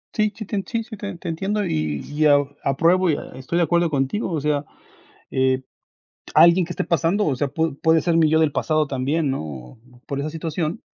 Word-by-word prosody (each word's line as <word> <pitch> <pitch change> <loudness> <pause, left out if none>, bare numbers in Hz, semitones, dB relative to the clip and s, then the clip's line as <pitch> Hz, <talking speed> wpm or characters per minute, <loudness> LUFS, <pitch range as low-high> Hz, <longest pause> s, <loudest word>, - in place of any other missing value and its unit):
Sí, 215 -2 +2
sí 220 - -7
te 200 0 -2
sí 230 -1 -1
te - - -5
te 200 -1 -6
te - - -9
entiendo 195 +5 -1
y 75 -2 -1
y, 150 +2 0 0.4
apruebo 170 +6 +3
y - - +3
e - - -4 0.2
estoy 130 +6 -3
de 175 - +4
acuerdo 170 0 +2
contigo, 145 - -1
o 160 - -1
sea, 145 -1 0 0.7
eh, 130 0 +1 0.7
alguien 170 +3 +7
que 175 - -6
esté - - -2
pasando 170 +4 +1
o 145 - +1
sea, 140 +3 -1
pudo 160 +1 -1
puede 160 +2 +3
ser 170 0 +1
mi 160 -2 +4
yo 160 - +4
del 160 -2 +2
pasado 155 0 +1
también, 140 +4 -1
¿no?, 70 - -7 0.3
por 140 -1 -3
esa 150 +2 -3
situación, 165 +3 -3
160 Hz, 210 wpm, -22 LUFS, 140-175 Hz, 0.7 s, alguien